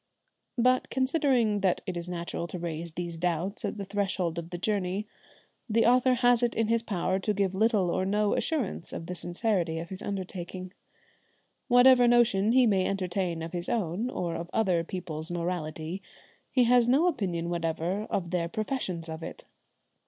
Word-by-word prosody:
But 255 +1 +3
conceding 260 -6 +2
that 190 -2 +1
it 185 -3 -4
is 175 +1 -5
natural 170 -1 -4
to 180 - -6
raise 170 -1 -4
these 170 -1 -5
doubts 175 +4 -2
at - - -3
the 200 - -4
threshold 190 -4 -1
of 170 0 -8
the 175 - -5
journey, 195 +1 -1 0.6
the 225 +1 +3
author 250 +1 +4
has 245 -1 +4
it 240 -1 +1
in 225 -1 +1
his 230 0 +3
power 190 -4 -1
to 210 +2 0
give 195 -2 +1
little 205 -3 +2
or 185 - 0
no 205 +2 +1
assurance 270 - -2
of 165 - -5
the 180 - -5
sincerity 175 -1 -1
of 170 +1 -5
his 190 0 -7
undertaking. 185 -1 -5 0.9
Whatever 245 -1 +7
notion 230 -4 +4
he 255 -1 +6
may 195 -4 +2
entertain 180 -3 -2
of 165 - -6
his 175 0 -3
own, 210 +2 -1
or 175 -8 -3
of 170 +1 -5
other 185 -6 +2
people's 165 -2 -4
morality, 170 0 -3 0.5
he 255 - +3
has 245 0 +4
no 275 +7 +4
opinion 180 - -1
whatever 170 +4 -1
of 175 -3 -2
their 170 -2 0
professions 190 -5 -3
of 160 0 -6
it. - - -8
190 Hz, 175 wpm, -28 LUFS, 170-225 Hz, 0.9 s, Whatever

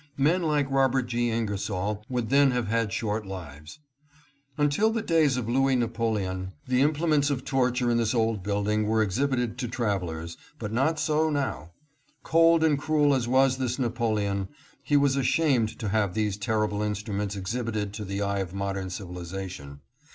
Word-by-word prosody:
Men 160 +7 +3
like 150 -4 +1
Robert 135 -1 +3
G. 120 0 -1
Ingersoll 105 -2 -2
would 125 -3 -2
then 140 0 +5
have 125 -3 -1
had 115 -2 0
short 110 -1 -2
lives. 80 - -9 0.8
Until 150 +9 +2
the 225 -1 -2
days 155 -8 +3
of 120 -3 -3
Louis 135 +2 +2
Napoleon, 110 -6 -1
the 125 0 +2
implements 150 0 +2
of 135 -3 -2
torture 125 -2 +1
in 120 - +2
this 115 +1 +1
old 110 -3 +1
building 105 +2 0
were 110 0 +3
exhibited 125 +2 -1
to 125 - -2
travelers, 90 -9 -3 0.2
but 110 -4 -5
not 145 +7 +1
so 155 +1 +1
now. 135 - -3 0.5
Cold 165 0 +4
and 150 -3 +3
cruel 150 -1 +2
as 125 -3 0
was 130 +1 +3
this 125 -1 -1
Napoleon, 110 -6 -1 0.3
he 145 - +2
was 140 -1 +3
ashamed 135 -4 +1
to 110 - -3
have 100 -2 0
these 105 -2 0
terrible 105 0 -1
instruments 105 -1 -2
exhibited 105 +1 -3
to 105 0 -5
the 100 +1 -3
eye 100 0 -1
of 95 -1 -4
modern 100 -1 -3
civilization. 90 -5 -7
115 Hz, 165 wpm, -27 LUFS, 100-135 Hz, 0.8 s, then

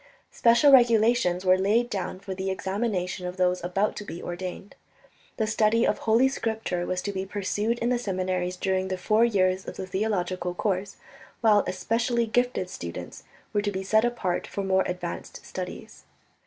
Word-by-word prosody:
Special 240 +5 +5
regulations 230 -7 +4
were 185 0 +5
laid 215 +5 +2
down 190 -4 -4
for 195 0 -6
the 190 +1 -3
examination 190 -2 -2
of 180 +1 -6
those 180 -1 +1
about 195 +4 0
to - - -6
be 175 -4 -7
ordained. 180 +3 -6 0.6
The 220 - +1
study 220 +1 +2
of - - +1
Holy 230 +4 +4
Scripture 220 -8 -2
was 185 0 -2
to 200 - -2
be 190 -1 -3
pursued 205 +3 -1
in 235 0 -1
the 250 -1 +1
seminaries 185 -3 -2
during 190 0 0
the 185 0 -2
four 215 +5 +2
years 190 -4 +2
of - - -7
the - - -4
theological 185 -2 -2
course, 195 0 -1 0.5
while 215 -3 +5
especially 230 +5 0
gifted 245 -4 0
students 85 - -8 0.3
were 205 - +2
to 205 0 -1
be 190 -1 -4
set 215 +3 +3
apart 235 -7 -1
for 200 - -4
more 190 0 +2
advanced 180 0 -6
studies. - - -7
195 Hz, 170 wpm, -26 LUFS, 185-225 Hz, 0.6 s, Special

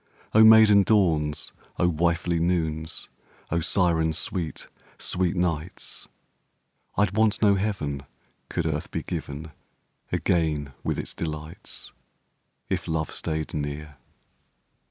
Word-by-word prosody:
O 110 - +8
maiden 110 -2 +8
dawns, 80 -8 +2 0.2
O 90 - +3
wifely 85 +1 +1
noons, 80 -2 -1 0.4
O 85 - +2
siren 80 -2 +2
sweet, 80 +1 -3 0.3
sweet 90 -1 0
nights, 85 -1 -2 0.9
I'd 100 0 +2
want 110 0 +3
no 100 -1 +6
heaven 85 -10 -2 0.4
could - - -1
earth - - -2
be - - -3
given 75 +3 -5 0.6
Again 75 -5 0
with - - -1
its - - -4
delights 75 0 -6 0.7
(If - - -2
love 80 -1 -1
stayed 80 -1 -3
near). 75 0 -4
85 Hz, 110 wpm, -26 LUFS, 75-95 Hz, 0.9 s, O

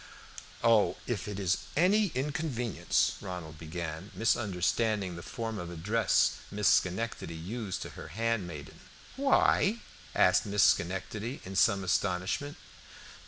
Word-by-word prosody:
"Oh, 115 -3 +4
if 105 -6 -3
it 100 -1 -4
is 95 -1 +1 0.2
any 200 +5 +4
inconvenience" 135 - 0
Ronald 85 -5 -7
began, 80 +3 -5
misunderstanding 105 -2 +1
the 85 - -7
form 110 +2 -5
of 85 - -6
address 100 +7 +2
Miss 105 -1 0
Schenectady 95 -1 +1
used 95 +4 -4
to - - -7
her - - -9
handmaiden. 100 -10 -3 0.4
"Why?" 265 -5 +3 0.4
asked - - +4
Miss 100 0 +3
Schenectady, 100 +7 0
in 95 +1 -7
some 100 0 +3
astonishment. 95 - -1
100 Hz, 120 wpm, -30 LUFS, 90-115 Hz, 0.4 s, Oh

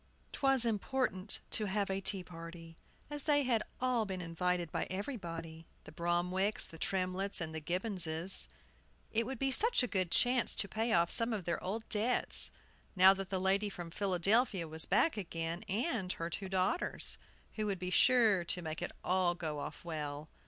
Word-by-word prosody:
TWAS 270 -3 +5
important 220 -2 0
to 215 - +1
have 200 0 -1
a 190 0 -2
tea 195 -1 +1
party, 165 -1 -11 0.4
as 295 0 -4
they 290 0 +2
had 240 -4 +1 0.2
all 250 -2 +1
been 190 -1 -4
invited 175 0 -2
by - - -2
everybody, 165 - -6 0.2
the - - -12
Bromwicks, 175 +5 0
the 165 - -10
Tremletts, 190 +2 -1
and 160 -2 -4
the 160 - -4
Gibbonses. 180 0 +2 0.6
It 230 0 0
would 265 -1 -5
be 270 +2 0
such 450 - +3
a - - 0
good 185 -5 -1
chance 245 +5 +2
to 200 - 0
pay 225 +3 -2
off 170 -3 +2
some 230 0 +3
of 205 -4 -3
their 170 0 -3
old 220 +5 -4
debts, 225 +4 +4 0.5
now 190 +1 +7
that 195 -1 -6
the 190 - -1
lady 195 +2 +1
from 175 -3 -8
Philadelphia 195 +1 +1
was 160 +1 -3
back 215 - +2
again, 165 -2 -4
and 210 - -1
her 165 +1 -5
two 195 +1 -5
daughters, 190 - 0 0.3
who 215 -1 -3
would 200 -2 -1
be 180 0 -5
sure 225 -6 +4
to 180 +1 -2
make 155 0 -5
it 175 - -4
all 180 -1 +1
go 155 -4 -4
off 145 - -8
well. 150 -2 -5
190 Hz, 180 wpm, -33 LUFS, 170-220 Hz, 0.6 s, now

